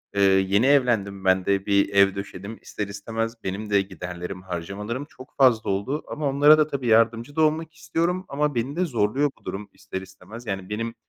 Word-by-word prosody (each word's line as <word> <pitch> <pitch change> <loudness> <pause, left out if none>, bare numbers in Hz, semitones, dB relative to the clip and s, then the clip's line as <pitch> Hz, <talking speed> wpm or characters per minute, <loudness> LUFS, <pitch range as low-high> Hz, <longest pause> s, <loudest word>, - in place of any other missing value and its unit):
eee, 100 - +2
yeni 95 +4 +4
evlendim, 110 -9 +2
ben 95 0 +3
de 100 -1 +1
bir 100 -1 +3
ev 100 0 +5
döşedim, 100 +2 -7
ister 105 -2 -5
istemez 115 +3 -4
benim 100 +3 -4
de 100 -1 +4
giderlerim, 90 -1 -7
harcamalarım 100 - -5
çok 130 -2 -15
fazla 125 -6 +4
oldu 100 +10 -1
ama 150 -2 -2
onlara 145 +3 +6
da 155 0 +3
tabii 135 -4 -3
yardımcı 115 +4 +3
da 160 - +2
olmak 155 +1 +1
istiyorum 170 +4 -1
ama 145 -1 0
beni 130 +6 -2
de 180 +1 +1
zorluyor 130 +2 +1
bu - - -30
durum, 100 +1 -5
ister 95 - -7
istemez. 95 +5 -12
Yani 95 -1 -4
benim 115 +2 -3
110 Hz, 190 wpm, -24 LUFS, 100-140 Hz, -, onlara